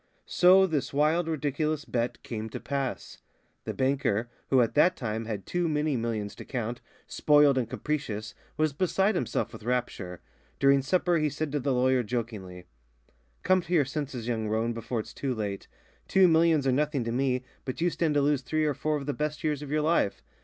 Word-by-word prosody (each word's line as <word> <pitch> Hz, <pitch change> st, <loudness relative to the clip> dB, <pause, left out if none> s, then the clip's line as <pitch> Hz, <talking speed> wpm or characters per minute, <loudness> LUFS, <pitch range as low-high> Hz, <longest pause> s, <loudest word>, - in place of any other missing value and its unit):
So 185 Hz, +2 st, +6 dB
this 150 Hz, -6 st, -2 dB
wild, 160 Hz, +4 st, +2 dB
ridiculous 155 Hz, 0 st, -1 dB
bet 120 Hz, 0 st, -2 dB
came 110 Hz, -1 st, -5 dB
to -, -, -6 dB
pass. 140 Hz, -2 st, -4 dB, 0.5 s
The -, -, -3 dB
banker, 130 Hz, -4 st, 0 dB, 0.2 s
who 135 Hz, -, +4 dB
at 115 Hz, -, +1 dB
that 175 Hz, +5 st, +4 dB
time 110 Hz, -2 st, -3 dB
had 105 Hz, -3 st, -5 dB
too 175 Hz, -1 st, -1 dB
many 150 Hz, -1 st, 0 dB
millions 115 Hz, -4 st, -2 dB
to -, -, -8 dB
count, 120 Hz, -2 st, -4 dB, 0.2 s
spoiled 145 Hz, -2 st, +4 dB
and 125 Hz, -4 st, -1 dB
capricious, 115 Hz, -9 st, -3 dB, 0.2 s
was 155 Hz, -2 st, +1 dB
beside 190 Hz, +6 st, +1 dB
himself 125 Hz, -, -2 dB
with 110 Hz, -, -9 dB
rapture. 105 Hz, -7 st, -3 dB, 0.4 s
During 140 Hz, 0 st, +4 dB
supper 175 Hz, +4 st, +1 dB
he 155 Hz, -1 st, +1 dB
said 145 Hz, +1 st, -3 dB
to 145 Hz, -, 0 dB
the 140 Hz, +1 st, -1 dB
lawyer 130 Hz, 0 st, +3 dB
jokingly: 105 Hz, -6 st, -5 dB, 0.8 s
"Come 185 Hz, 0 st, +3 dB
to 175 Hz, +1 st, -5 dB
your 155 Hz, -5 st, +4 dB
senses, 135 Hz, -4 st, -4 dB
young 110 Hz, -3 st, -1 dB
roan, 110 Hz, +2 st, 0 dB
before 115 Hz, +1 st, -3 dB
it's -, -, -12 dB
too 135 Hz, -3 st, -2 dB
late. 100 Hz, -3 st, -4 dB, 0.4 s
Two 190 Hz, -1 st, +5 dB
millions 160 Hz, -3 st, +4 dB
are 135 Hz, -, +3 dB
nothing 145 Hz, 0 st, 0 dB
to 115 Hz, -, -3 dB
me, 130 Hz, 0 st, 0 dB, 0.2 s
but 130 Hz, -, -5 dB
you 175 Hz, +1 st, +2 dB
stand 160 Hz, -3 st, 0 dB
to 145 Hz, -, +4 dB
lose 145 Hz, -1 st, +2 dB
three 155 Hz, +4 st, 0 dB
or 150 Hz, -, +1 dB
four 150 Hz, +3 st, -1 dB
of 140 Hz, -, -6 dB
the 145 Hz, -, -1 dB
best 150 Hz, +1 st, -3 dB
years 150 Hz, -2 st, 0 dB
of 145 Hz, -, -7 dB
your 150 Hz, +1 st, +1 dB
life. 155 Hz, -10 st, +1 dB
140 Hz, 195 wpm, -28 LUFS, 115-155 Hz, 0.8 s, So